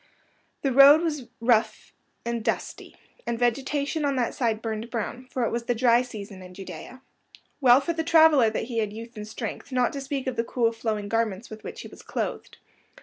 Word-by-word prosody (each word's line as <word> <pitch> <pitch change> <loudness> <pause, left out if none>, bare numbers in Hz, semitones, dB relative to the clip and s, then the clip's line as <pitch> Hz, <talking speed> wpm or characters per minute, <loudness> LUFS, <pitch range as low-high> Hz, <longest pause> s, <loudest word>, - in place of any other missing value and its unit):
The 275 - +1
road 280 +5 +8
was 300 -7 -2
rough 225 -2 +1 0.3
and 235 -1 -2
dusty, - - -3 0.3
and 235 -1 -1
vegetation 275 +6 0
on 280 -1 +1
that 245 -2 0
side 230 -4 0
burned 225 0 -4
brown, 245 +2 -4
for 250 -2 -1
it - - -1
was 235 0 -3
the 245 - 0
dry 235 0 +4
season 210 -6 -8
in 180 0 -12
Judea. 225 +6 -9 0.6
Well 255 -2 +7
for 335 +4 -2
the 325 -1 -2
traveller 315 -7 +6
that 220 - -3
he 230 0 -3
had 215 -2 -1
youth 230 +2 -9
and 210 0 -7
strength, 225 +4 -6
not 250 -1 +1
to 280 - -4
speak 270 0 -4
of 260 -2 -3
the 230 - +1
cool, 230 -1 +1
flowing 220 -3 -3
garments 225 -1 -1
with 215 0 -9
which 470 +1 -7
he - - -8
was - - -14
clothed. - - -5
240 Hz, 205 wpm, -26 LUFS, 225-270 Hz, 0.6 s, road